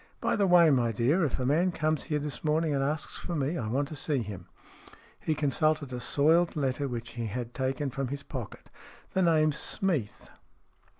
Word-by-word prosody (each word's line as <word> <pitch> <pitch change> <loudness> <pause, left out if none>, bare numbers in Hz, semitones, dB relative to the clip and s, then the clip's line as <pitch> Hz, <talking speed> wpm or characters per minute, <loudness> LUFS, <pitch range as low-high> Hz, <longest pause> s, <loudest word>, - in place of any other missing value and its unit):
" - - -37
By - - +2
the 200 -2 +2
way, 175 -3 +6
my 120 -4 +2
dear, 125 - +2
if 140 -5 -1
a 125 - -1
man 165 +7 +2
comes 155 -2 -1
here 150 -2 -1
this 145 -1 -4
morning 155 0 +1
and 135 -1 +1
asks 150 +2 -3
for 175 - -4
me, 145 +2 -1
I 120 -10 -3
want 135 +6 0
to 155 - -6
see 140 -3 0
him." 95 -4 -8 0.7
He 155 - -1
consulted 150 -1 0
a 125 - -3
soiled 160 +7 +3
letter 140 -1 -1
which 115 -2 -5
he 115 -1 -4
had 120 +2 -5
taken 135 +1 -2
from 135 +1 -2
his 140 +2 -5
pocket. 125 -7 -8 0.4
"The 190 - +2
name's 155 -4 +3
Smeath." 160 - -2
145 Hz, 200 wpm, -29 LUFS, 125-155 Hz, 0.7 s, way